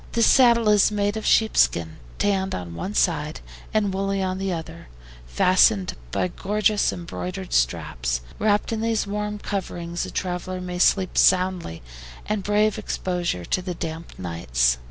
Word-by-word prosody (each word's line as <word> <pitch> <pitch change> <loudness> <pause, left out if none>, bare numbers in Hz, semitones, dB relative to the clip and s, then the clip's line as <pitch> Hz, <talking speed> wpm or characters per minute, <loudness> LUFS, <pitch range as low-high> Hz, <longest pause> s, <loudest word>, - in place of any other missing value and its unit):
This 230 -1 +3
saddle 235 -3 +5
is 210 -1 +5
made 205 0 0
of 220 - -3
sheepskins, 85 - +2 0.2
tanned 195 -1 0
on 90 -2 -6
one 190 - -5
side 155 -5 0 0.3
and 205 -3 +1
woolly 195 +1 -1
on 185 0 -2
the 195 0 -2
other, 165 0 -6 0.4
fastened 185 - +3 0.2
by 180 - -1
gorgeous 210 +3 +1
embroidered 180 +2 -6
straps. - - 0 0.2
Wrapped 210 +1 +1
in 220 - -2
these 225 -1 0
warm 210 +1 -3
coverings 175 -4 -4
a - - -7
traveler 185 0 -3
may 180 -1 -5
sleep 185 0 +3
soundly, 180 - +2 0.4
and 210 -1 -1
brave 210 +2 +1
exposure 175 - -2
to 185 - 0
the 180 -1 -5
damp 165 0 -6
nights. 60 -9 0
185 Hz, 150 wpm, -23 LUFS, 165-205 Hz, 0.4 s, saddle